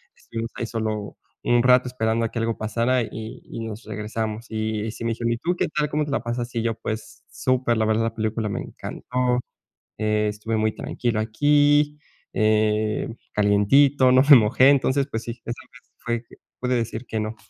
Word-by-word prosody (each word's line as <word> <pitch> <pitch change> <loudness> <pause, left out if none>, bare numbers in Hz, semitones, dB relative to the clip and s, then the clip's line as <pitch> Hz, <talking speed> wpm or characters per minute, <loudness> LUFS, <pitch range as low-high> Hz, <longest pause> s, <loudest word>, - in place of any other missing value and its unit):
Estuvimos 115 0 -6
ahí - - -3
solo 110 -2 -3 0.3
un 120 0 +3
rato 125 0 +5
esperando 115 -2 0
a - - -2
que 115 - -3
algo 115 0 -1
pasara 115 +4 +1
y 110 +1 -8
nos 110 0 -7
regresamos" 110 +1 -4
y 110 -1 -2 0.2
me 115 - 0
dijeron: 115 +1 -1
"¿Y - - -3
tú 175 +6 0
qué - - +1
tal? 150 -1 -1
¿Cómo 150 0 0
te 145 - -6
la - - 0
pasas?" 120 +1 -3
Y 115 - +1
yo: 115 -1 0
"Pues, 110 0 -6
super 130 -2 0
la 110 - +2
verdad. 110 +1 +2
La 115 - -3
película 110 0 -1
me 100 - -3
encantó. 125 0 -2 0.6
Eh, 105 0 +1
estuve 105 +2 -3
muy 110 0 +1
tranquilo 120 -3 -2
aquí, 145 +5 +3 0.3
eh, 110 0 +1 0.3
calientito, 130 +7 +4
no 130 - +7
me 145 - +12
mojé." 120 +4 +5
Entonces, 140 0 +3
pues, 115 +1 -3
si 115 +1 -6 1.2
puede 125 0 +1
decir 115 +1 -3
que 110 - -2
no. 110 +1 -3
115 Hz, 175 wpm, -24 LUFS, 110-125 Hz, 1.2 s, me